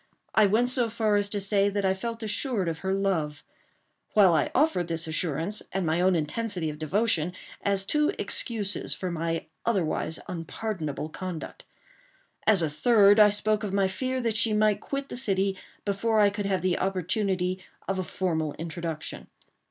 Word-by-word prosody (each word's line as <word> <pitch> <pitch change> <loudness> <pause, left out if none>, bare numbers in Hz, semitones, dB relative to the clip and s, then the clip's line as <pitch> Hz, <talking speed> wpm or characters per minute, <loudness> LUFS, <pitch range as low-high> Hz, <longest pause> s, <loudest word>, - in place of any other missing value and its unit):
I 215 -1 +5
went 225 +5 +2
so 250 -2 +1
far 215 -2 +1
as 205 0 +1
to 205 - -1
say 200 0 +3
that 200 -1 -1
I 190 - +3
felt 230 +4 -5
assured 215 - 0
of 160 -1 -2
her 190 - -2
love; 170 -7 -1 0.7
while 195 -5 +6
I 160 - +2
offered 265 - +2
this 165 0 -1
assurance, 160 +4 -2
and 190 -2 -1
my 160 +2 +1
own 185 0 +4
intensity 170 +1 -1
of 150 - -10
devotion, 175 0 +1 0.3
as 200 -1 +1
two 300 - +2
excuses 210 -4 0
for 185 -2 -4
my 165 0 -2 0.2
otherwise 175 -7 0
unpardonable 165 -3 -4
conduct. 180 0 -7 0.8
As 205 -6 +6
a - - +2
third, 205 +6 +5
I 210 -1 +8
spoke 210 +1 0
of 200 -2 -3
my 195 -1 +3
fear 255 +7 -2
that 230 -3 0
she 225 -1 +3
might 210 -1 +2
quit 275 0 -4
the - - -7
city 195 -5 +1 0.3
before 215 +2 +1
I 205 -1 +5
could 205 -1 -3
have 190 -3 0
the 185 -1 +1
opportunity 185 0 -1 0.2
of 195 -1 -1
a - - 0
formal 160 -4 -2
introduction. 165 -1 -5
195 Hz, 175 wpm, -27 LUFS, 170-215 Hz, 0.8 s, I